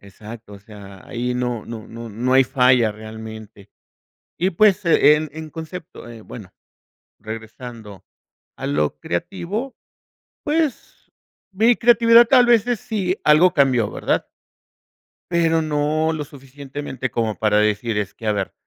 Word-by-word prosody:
Exacto, 105 +2 -12
o - - -12
sea, 100 -2 -13
ahí 125 +1 -3
no 125 -3 -3
no 115 -2 -8
no 115 0 -9
no 120 +5 -2
hay 135 0 +6
falla 125 -3 +3
realmente. 110 -1 -11 0.7
Y 185 +2 +1
pues, 205 +2 +3
en 155 -2 +4
en 155 0 -8
concepto 160 -4 -9
eh, 115 -1 -11
bueno, 105 -6 -11 0.7
regresando 110 -1 -9 0.5
a - - -6
lo 75 +1 -1
creativo, 195 - -4 0.7
pues, 300 -3 -3 0.4
mi 225 +5 +3
creatividad 230 0 +6
tal 250 -1 +5
vez 235 -1 +4
es 240 -4 0
sí, 195 -4 -2
algo 165 +4 +5
cambió, 130 -7 +2
¿verdad? - - -1 1.1
Pero 165 -1 +2
no 155 +1 0
lo 155 -2 -4
suficientemente, 135 -1 -7
como 110 -2 -2
para 105 -1 +1
decir: 105 +1 0
"Es 100 -1 -3
que 110 - -8
a 105 - +2
ver, 100 -2 -3
130 Hz, 140 wpm, -21 LUFS, 110-170 Hz, 1.1 s, hay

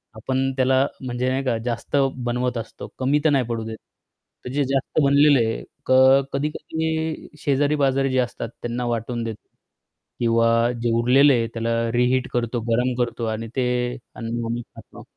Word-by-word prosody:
आपण 130 +4 -1
त्याला 130 +1 +3 0.2
म्हणजे 125 0 -2
नाही 130 +1 -1
का 120 -4 0
जास्त 120 +3 -3 0.3
बनवत 125 0 -1
असतो, 115 - -7
कमी 135 +3 +2
तर - - +6
नाही 135 -4 +2
पडू 115 -1 -2
देत, 110 0 -6 0.7
तर - - -4
जे 145 +1 +1
जास्त 135 +3 -1
बनलेलं 140 0 +5
आहे, 115 -1 -1 0.2
क - - -2 0.4
कधी-कधी 160 +2 -3
शेजारी-पाजारी 140 -1 +1
जे 130 - 0
असतात 125 -2 -2
त्यांना 120 +1 -3
वाटून 120 0 -2
देतो 110 -2 -7 0.7
किंवा 115 0 +3
जे 120 -1 +1
उरलेलं 135 +4 +5
आहे 115 -2 +1
त्याला 115 0 -1
रिहीट 125 +2 +2
करतो 120 0 -1
गरम 125 +2 +2
करतो 120 0 -4
आणि 115 +1 -6
ते 130 -2 +1 0.5
अन्न 115 0 -4
आम्ही 120 +1 -2
खातो - - -13
125 Hz, 160 wpm, -23 LUFS, 115-135 Hz, 0.7 s, तर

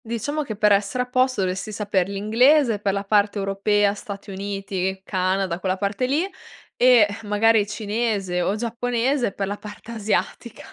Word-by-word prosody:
Diciamo 235 +7 -3
che 230 -7 -5
per 210 0 +3
essere 200 +5 +2
a - - -8
posto 255 -2 +1
dovresti 190 +3 -2
saper 200 -3 0
l'inglese, 230 +4 +3
per 200 -1 0
la 200 +1 -2
parte 205 0 +2
europea, 200 +1 +1
Stati 200 -1 -8
Uniti, 195 -1 -3
Canada, 185 -2 -1
quella 185 0 -1
parte 205 +6 -1
lì, 305 +8 +1 0.5
ehm, 245 -3 +6 0.2
magari 210 0 +3
cinese 210 -3 -2
o 190 +3 0
giapponese 240 +2 -1
per 195 0 -3
la 205 +1 -4
parte 210 +2 -10
asiatica. 220 +1 -3
205 Hz, 155 wpm, -23 LUFS, 195-235 Hz, 0.5 s, ehm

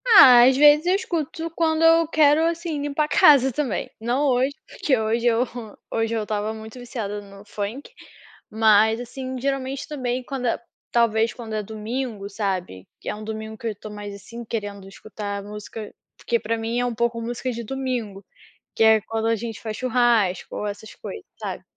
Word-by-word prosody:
Ah, 265 - +9
às 260 +1 +4
vezes, 295 +2 +7
eu 365 - +4
escuto 330 -3 -3
quando 320 -1 +1
eu 330 0 +6
quero, 305 0 +4
assim, 335 -3 -2
limpar 290 +1 0
a - - -7
casa, 270 -3 +6
também. 255 -4 -2
Não 245 +6 0
hoje, 260 +1 +2
porque 265 -3 0
hoje 225 +2 0
eu, 235 +1 +3 0.5
hoje 225 0 0
eu 220 - -1
estava 210 0 -2
muito 220 +2 -10
viciada 220 -5 -5
no 200 0 -14
funk, 210 - -5 0.6
mas 220 0 +4
assim, 255 +1 -6
geralmente 270 0 -2
também, 255 -4 -3
quando 255 -1 -3
é - - 0 0.3
talvez, 230 -1 +2
quando 230 -3 -8
é 215 - -1
domingo, 220 0 -4
sabe, 185 - -3
que - - -13
é - - -2
um 215 - -9
domingo 220 0 -6
que 230 - -5
eu - - 0
estou 210 +1 -10
mais, 205 -1 -7
assim, 230 +4 -9
querendo 205 -3 -5
escutar 200 0 -6
música 210 +1 -8 0.2
porque 235 - 0
para 225 +1 -1
mim 225 +2 -2
é 245 - +1
um 245 - -1
pouco 235 +1 0
música 240 +2 -3
de 235 0 -5
domingo, 240 -5 -4 0.5
que - - +3
é 220 -1 +6
quando 225 +1 -2
a 230 - +3
gente 225 0 -6
faz 220 -1 -4
churrasco 235 -7 +1
ou 210 - -3
essas 205 +1 -7
coisas, 410 -4 -8
sabe. - - -5
230 Hz, 185 wpm, -23 LUFS, 215-265 Hz, 0.6 s, Ah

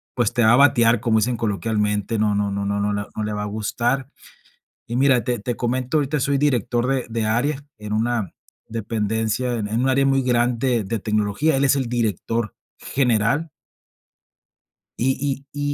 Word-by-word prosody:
pues 120 -5 +1
te 120 - +2
va 110 - +6
a - - +6
batear, 120 -5 +5
como 115 -2 +2
dicen 120 +3 0
coloquialmente, 105 0 -1
no 105 -1 +2
no 100 0 0
no 100 0 -2
no 100 0 -1
no 105 0 0
le 105 0 -3
no 110 - -2
le 105 0 -2
va 105 - -3
a - - -3
gustar. 120 +5 -1 0.8
Y 120 - -4
mira, 130 -2 +4
te 125 -1 -1
te 120 +3 -3
comento, 125 +5 -1
ahorita 145 0 0
soy 140 +1 +1
director 125 -4 +1
de 135 -1 0
de 115 -1 -1
área 135 +6 0 0.2
en 105 0 -5
una 110 -3 -1 0.4
dependencia 110 +2 -1
en 105 -3 -2
un 135 - +2
área 135 +1 +3
muy 135 0 +3
grande 120 -1 +1
de 110 +3 -2
tecnología, 105 +8 0
él 140 - +2
es 140 - +4
el 130 -3 -1
director 115 -1 -1 0.3
general. 125 +4 +1 1.5
Y 135 +2 -1
y 145 - -6
120 Hz, 180 wpm, -22 LUFS, 105-130 Hz, 1.5 s, va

